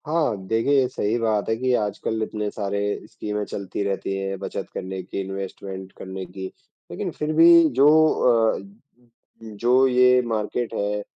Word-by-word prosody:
हाँ, 155 -7 +1
देखिए 130 +5 +2
सही 110 -2 -1
बात 110 -3 0
है 110 - +2
कि 130 +1 0
आजकल 110 +1 -2
इतने 105 -1 -3
सारे 100 -1 -3 0.3
स्कीमें 105 0 -4
चलती 100 0 -5
रहती 95 0 -2
है 95 0 -3
बचत - - -5
करने 95 0 -5
की, 90 - -6
इनवेस्टमेंट 95 0 -7
करने 95 0 -7
की, 95 +2 -8 0.5
लेकिन - - -4
फिर 150 +1 -1
भी 170 +1 +7 0.2
जो 140 - +7 0.7
अ, - - -9 0.8
जो 120 +5 +2
ये 125 0 +5
मार्केट 115 +1 -2
है, 105 0 -1
105 Hz, 150 wpm, -23 LUFS, 95-125 Hz, 0.8 s, भी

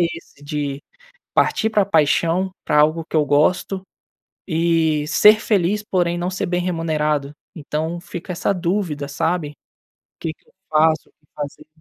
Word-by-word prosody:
esse 165 -4 -4
de 145 -1 -3 0.5
partir 220 - +2
para 215 -1 +3
a - - -5
paixão, 170 +2 +2
para 150 - +3
algo 155 +2 +3
que - - -4
eu 150 - +3
gosto 180 +6 +2 0.7
e 160 -2 +1
ser 210 +7 +6
feliz, 205 0 +1
porém 175 -4 0
não 175 +1 -1
ser 185 - -2
bem 175 0 0
remunerado. 155 -5 -1 0.2
Então, 160 +2 -3
fica 175 +1 -7
essa 180 +3 0
dúvida, 170 -5 -2
sabe. 160 +1 -1
O - - -20 0.7
que 160 - -3
que - - -36
eu - - -27 0.2
faço? 155 0 +3
O - - -43
que 150 - -38
fazer? 145 -1 -6
165 Hz, 165 wpm, -21 LUFS, 150-180 Hz, 0.7 s, ser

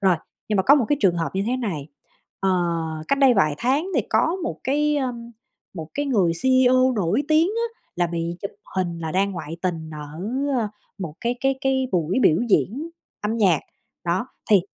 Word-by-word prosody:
rồi, 190 -3 +4 0.3
nhưng 210 - +1
mà 190 - +3
có 280 +8 +7
một 275 - +3
cái 290 - +2
trường 175 -7 +3
hợp 165 - 0
như 195 - 0
thế 250 +2 +1
này, 165 - -3 0.5
ờ, 195 - +2 0.6
cách 280 - +2
đây 265 -3 +6
vài 155 -7 +3
tháng 275 +8 +1
thì 260 - +4
có 320 +11 +2
một 335 - -3
cái, 295 +2 +2
ơ, 260 -3 0 0.6
một 160 -4 -6
cái 290 0 -1
người 200 -11 +2
CEO 255 0 +4
nổi 205 +7 +1
tiếng 315 +2 +4
á 460 +2 -3 0.2
là 175 0 +2
bị 170 0 -3
chụp 200 - -3 0.3
hình 175 -3 -1
là 160 -1 -4
đang 195 +2 +2
ngoại 165 -2 -6
tình 165 -4 -2
ở, 150 +1 -8 0.4
ơ, 220 -3 0 0.3
một 170 -6 -5
cái 240 +1 0
cái 270 0 +2
cái 265 -1 +1
buổi 175 +5 +1
biểu 160 -6 +5
diễn 270 - +1 0.3
âm 215 +2 -1
nhạc, 185 -8 +3 0.4
đó, 180 +7 0 0.2
thì 200 - +7
210 Hz, 200 wpm, -23 LUFS, 170-265 Hz, 0.6 s, có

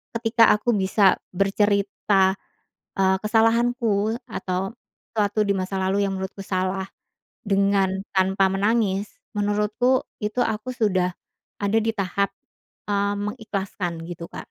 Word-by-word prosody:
ketika 230 0 +4
aku 225 +2 0
bisa 195 0 +4 0.2
bercerita, 195 0 +2 0.6
eee, 190 0 +3
kesalahanku 225 -1 +2
atau 185 +2 -3 0.4
sesuatu 210 -1 +1
di 200 - 0
masa 190 +1 -3
lalu 195 +2 +1
yang 195 - -2
menurutku 190 +1 -5
salah 185 0 -1 0.6
dengan 195 -1 +2 0.2
tanpa 190 +1 +3
menangis. 205 0 +1 0.3
Menurutku 210 +5 +1 0.2
itu 215 +4 -1
aku 220 +3 -3
sudah 185 -7 +1 0.5
ada 205 +2 +2
di 225 - +1
tahap, 200 -1 -1 0.6
eee, 200 0 +1
mengikhlaskan 195 -6 -4
gitu, 170 -1 -7
Kak. - - -12
200 Hz, 115 wpm, -24 LUFS, 190-215 Hz, 0.6 s, ketika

